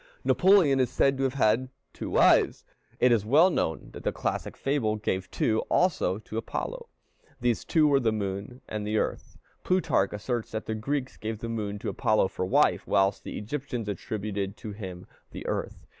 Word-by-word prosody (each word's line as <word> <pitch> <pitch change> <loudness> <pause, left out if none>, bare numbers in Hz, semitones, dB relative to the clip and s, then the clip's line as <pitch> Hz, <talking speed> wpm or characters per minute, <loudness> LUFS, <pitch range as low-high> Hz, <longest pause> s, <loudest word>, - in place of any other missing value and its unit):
Napoleon 180 -8 +5
is 130 - +2
said 135 0 +2
to 135 - -1
have 130 0 -1
had 125 +1 +2 0.2
two - - -6
wives. - - +4 0.3
It 125 - +5
is 115 -4 +3
well 155 - +5
known 80 - -2
that - - -9
the - - +1
classic - - -3
fable 135 -6 0
gave 95 -3 -2
two 110 0 +1
also 155 - +2
to 110 0 -8
Apollo. - - -5 0.5
These 120 -2 0
two 155 -2 +4
were 140 -2 +4
the 115 -4 +1
moon 100 +4 -4
and 105 -1 -4
the 110 +1 0
earth. - - -3 0.3
Plutarch 180 - +2
asserts 115 +3 -3
that 110 - -3
the 110 - -2
Greeks 135 +5 -3
gave 110 0 -4
the 115 +2 -6
moon 105 -3 -3
to - - -4
Apollo 110 -3 +2
for 95 - -3
wife, - - +3
whilst 95 0 +2
the - - -6
Egyptians 125 0 -4
attributed 100 -1 -4
to 110 - -7
him 95 -4 -8 0.2
the - - -8
earth. - - -4
110 Hz, 185 wpm, -27 LUFS, 105-135 Hz, 0.5 s, Napoleon